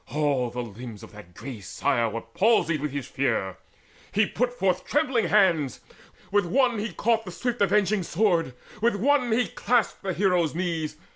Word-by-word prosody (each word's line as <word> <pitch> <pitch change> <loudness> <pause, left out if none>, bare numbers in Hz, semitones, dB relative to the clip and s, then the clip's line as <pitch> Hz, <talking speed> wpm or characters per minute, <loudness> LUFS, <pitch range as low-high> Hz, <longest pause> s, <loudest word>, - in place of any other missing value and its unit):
All 140 -4 +1
the 125 +1 -4
limbs 115 -1 -9
Of - - -12
that 100 -5 -14
grey 130 -6 -7
sire 115 +5 0
were 115 +2 -4
palsied 170 - +2
with 150 - -1
his 140 -3 -4
fear: 115 -9 -1 0.5
He 215 +2 +3
put 245 +4 -1
forth 185 -6 0
trembling 270 -6 +1
hands, 175 -10 +3 0.5
with 205 -3 +2
one 245 +3 +2
he 215 +2 -3
caught 225 0 +1
The 190 - -8
swift 240 +6 -3
avenging 205 0 +3
sword, 170 - +1 0.3
with 235 -1 +3
one 250 +3 +2
he 240 +2 +3
clasped 240 -2 0
The 190 -1 -2
hero's 180 -4 +1
knees. 165 -4 -2
180 Hz, 170 wpm, -26 LUFS, 135-220 Hz, 0.5 s, He